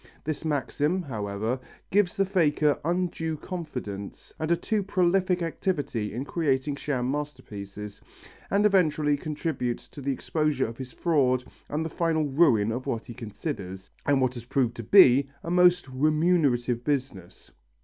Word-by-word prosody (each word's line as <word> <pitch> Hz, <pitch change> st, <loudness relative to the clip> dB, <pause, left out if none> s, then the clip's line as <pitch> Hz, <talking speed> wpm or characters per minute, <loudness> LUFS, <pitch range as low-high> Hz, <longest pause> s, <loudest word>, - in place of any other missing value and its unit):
This 155 Hz, +1 st, -3 dB
maxim, 150 Hz, +3 st, 0 dB
however, 110 Hz, -2 st, -3 dB, 0.3 s
gives 195 Hz, -2 st, +2 dB
the 195 Hz, -, +3 dB
faker 155 Hz, -6 st, +2 dB
undue 165 Hz, -1 st, -1 dB
confidence 125 Hz, -, -6 dB
and 155 Hz, -, -2 dB
a 170 Hz, -, +3 dB
too 215 Hz, +3 st, 0 dB
prolific 185 Hz, -1 st, +1 dB
activity 145 Hz, -, -2 dB
in 125 Hz, +5 st, -4 dB
creating 145 Hz, -3 st, 0 dB
sham 130 Hz, -3 st, -1 dB
masterpieces, 105 Hz, -8 st, -6 dB, 0.5 s
and 200 Hz, +1 st, +3 dB
eventually 155 Hz, -7 st, +3 dB
contributes 145 Hz, -4 st, -3 dB
to 145 Hz, -, -10 dB
the 140 Hz, +1 st, -1 dB
exposure 150 Hz, 0 st, 0 dB
of 115 Hz, +2 st, -7 dB
his 130 Hz, -1 st, -6 dB
fraud 130 Hz, -7 st, +2 dB, 0.3 s
and 155 Hz, +2 st, -1 dB
the -, -, -3 dB
final 160 Hz, -2 st, +1 dB
ruin 135 Hz, -8 st, +3 dB
of 125 Hz, +3 st, -4 dB
what 115 Hz, -1 st, -2 dB
he 120 Hz, -, -8 dB
considers, 100 Hz, -, -6 dB
and 140 Hz, -2 st, +2 dB
what 130 Hz, -1 st, +2 dB
has 120 Hz, -2 st, -8 dB
proved 125 Hz, -2 st, +1 dB
to 115 Hz, -, -5 dB
be, 135 Hz, -, +7 dB
a 165 Hz, -, -4 dB
most 180 Hz, -2 st, +5 dB
remunerative 140 Hz, -4 st, +2 dB
business. 130 Hz, -11 st, -3 dB
145 Hz, 150 wpm, -27 LUFS, 125-165 Hz, 0.5 s, be